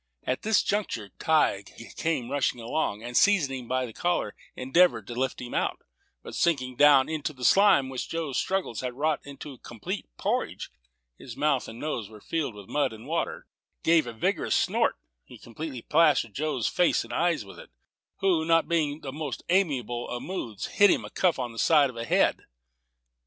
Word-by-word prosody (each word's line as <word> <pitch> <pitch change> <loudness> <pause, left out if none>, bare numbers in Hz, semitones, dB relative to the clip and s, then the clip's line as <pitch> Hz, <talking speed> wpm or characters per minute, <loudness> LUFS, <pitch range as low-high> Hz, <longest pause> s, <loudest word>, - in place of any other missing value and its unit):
At 130 - -2
this 220 0 +3
juncture 155 - -2
Tige 115 -8 0
came 135 -7 -1
rushing 140 -3 0
along, 115 -2 -2
and, 120 +1 -6
seizing 155 -10 +3
him 120 - -11
by 130 +1 0
the 115 - -9
collar, 175 - -1 0.2
endeavored 170 +8 +3
to 120 - -7
lift 130 +2 -2
him 125 -1 -7
out; - - -1 0.4
but - - -9
sinking 130 -7 0
down 145 -1 +6
into 155 -1 -3
the 125 -2 -5
slime, 195 -9 +5
which 130 -1 -5
Joe's 160 -5 -2
struggles 190 - -2
had 125 -1 -4
wrought 150 +2 0
into 140 0 -9
a - - -14
complete 115 -4 -6
porridge, - - -2 0.5
his 120 -3 -10
mouth 145 -4 +1
and 115 - -9
nose 120 -9 -3
were 110 -1 -13
filled 145 -1 -3
with 100 -2 -11
mud 145 -5 0
and 110 0 -11
water: - - -2 0.4
giving 160 -8 +3
a - - -21
vigorous - - 0
snort, - - +2 0.3
he - - -14
completely 130 +1 -7
plastered 150 -8 +3
Joe's 145 -4 -1
face 180 -1 +2
and - - -9
eyes 170 -9 +1
with 100 - -12
it, - - -12 0.5
who, 180 -5 +3
not 165 0 +3
being 160 -4 +1
in 150 - -12
the 135 - -6
most 150 -3 -5
amiable 130 - 0
of 120 - -4
moods, 120 - -5
hit 205 0 +4
him - - +1
a - - -10
cuff 180 -3 +2
on 125 -2 -3
the 115 - -8
side 145 -5 +4
of - - -18
the 115 0 -4
head. - - +2
140 Hz, 195 wpm, -27 LUFS, 120-160 Hz, 0.5 s, down